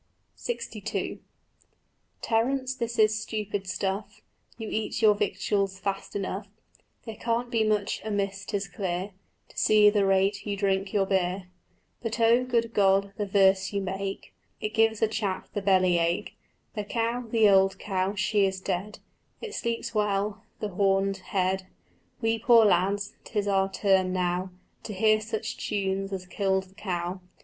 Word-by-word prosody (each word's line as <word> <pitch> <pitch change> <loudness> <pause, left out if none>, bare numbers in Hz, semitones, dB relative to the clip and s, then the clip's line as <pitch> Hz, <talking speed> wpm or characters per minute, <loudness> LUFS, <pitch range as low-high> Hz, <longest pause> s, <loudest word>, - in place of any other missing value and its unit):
LXII 480 - -4 1.1
"Terence, 255 +3 +1
this 235 -2 -4
is 215 0 +3
stupid 205 -3 -4
stuff: 195 +2 -3 0.3
You 225 - -6
eat 215 0 -2
your 215 -1 +7
victuals 200 -1 -1
fast 195 +1 -4
enough; 200 +1 -3 0.6
There 225 - -6
can't 235 +2 -1
be 225 -2 +2
much 210 -2 0
amiss, 200 -2 -2
'tis 200 -2 -2
clear, 185 +1 -3 0.4
To - - -19
see 210 -1 +6
the 205 -1 +2
rate 195 +1 +2
you 205 -1 -3
drink 195 -1 0
your 200 -2 +2
beer. 185 -1 -1 0.5
But 230 0 -3
oh, 230 +2 +5
good 235 -2 0
Lord, 195 0 +3
the 205 - -2
verse 190 0 +3
you 200 - +1
make, 195 +1 -4 0.3
It 215 - -3
gives 225 -1 +2
a - - +5
chap 210 -3 -3
the 205 - -2
belly 185 -3 +3
ache. 170 +1 -1 0.4
The 210 - -3
cow, 230 +3 -1
the 220 -1 +4
old 195 -1 +4
cow, 190 0 -1
she 200 0 +2
is 190 0 -3
dead; 190 +2 -3 0.4
It 450 -3 -7
sleeps 235 - -3
well, 210 -1 0 0.2
the 210 - -2
horned 195 0 +1
head: 190 0 -1 0.5
We 225 0 +1
poor 230 -1 +6
lads, 200 +2 +2
'tis 210 -2 -2
our 195 -1 +2
turn 190 -2 +2
now 180 0 0 0.3
To 215 - -6
hear 215 +2 +3
such 220 0 -4
tunes 195 -1 -2
as 190 -2 -4
killed 190 0 0
the 190 0 -20
cow. 185 -2 -3
200 Hz, 155 wpm, -27 LUFS, 190-215 Hz, 1.1 s, your